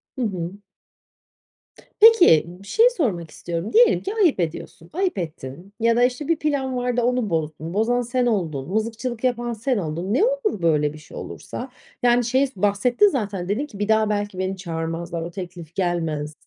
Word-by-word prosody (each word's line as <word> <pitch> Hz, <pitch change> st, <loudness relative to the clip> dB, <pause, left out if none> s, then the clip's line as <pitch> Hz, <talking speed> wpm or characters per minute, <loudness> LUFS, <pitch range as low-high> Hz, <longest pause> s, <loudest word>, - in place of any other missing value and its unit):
Hı 260 Hz, -, -4 dB
hı. 180 Hz, -6 st, -2 dB, 1.5 s
Peki, 415 Hz, -, +7 dB
bir 180 Hz, +3 st, -12 dB
şey 465 Hz, +3 st, +5 dB
sormak 200 Hz, -, -2 dB
istiyorum. 170 Hz, +3 st, -5 dB
Diyelim 475 Hz, +2 st, +5 dB
ki 395 Hz, -, -3 dB
ayıp 355 Hz, -, +3 dB
ediyorsun, 165 Hz, 0 st, -4 dB
ayıp 370 Hz, -, -1 dB
ettin 165 Hz, +2 st, -7 dB
ya 230 Hz, 0 st, +3 dB
da, 245 Hz, -, +3 dB
işte, 255 Hz, +4 st, 0 dB
bir 330 Hz, -2 st, +1 dB
plan 275 Hz, -4 st, -1 dB
vardı 245 Hz, 0 st, 0 dB
onu 245 Hz, -2 st, 0 dB
bozdun, 160 Hz, 0 st, -3 dB
bozan 235 Hz, +4 st, +1 dB
sen 245 Hz, +1 st, 0 dB
oldun, 165 Hz, -, -1 dB
mızıkçılık 225 Hz, +3 st, -3 dB
yapan 240 Hz, -2 st, 0 dB
sen 240 Hz, +2 st, -1 dB
oldun. 170 Hz, +3 st, -3 dB
Ne 305 Hz, -, +3 dB
olur 485 Hz, -, -1 dB
böyle 150 Hz, -3 st, +2 dB
bir -, -, -10 dB
şey 150 Hz, -1 st, -12 dB
olursa? 255 Hz, -, -7 dB, 0.3 s
Yani, 245 Hz, 0 st, +4 dB
şeyi 260 Hz, +4 st, +2 dB
s 265 Hz, -, -17 dB
bahsettin 210 Hz, -, +3 dB
zaten 205 Hz, -, -2 dB
dedin 250 Hz, +9 st, 0 dB
ki 210 Hz, -9 st, -12 dB
"Bir 205 Hz, -, -1 dB
daha 220 Hz, -1 st, +3 dB
belki 205 Hz, -2 st, -2 dB
beni 190 Hz, +1 st, -2 dB
çağırmazlar. 165 Hz, -1 st, -4 dB
O 170 Hz, +1 st, -5 dB
teklif 175 Hz, -3 st, -8 dB
gelmez." 165 Hz, -5 st, -1 dB
210 Hz, 180 wpm, -23 LUFS, 170-250 Hz, 1.5 s, Peki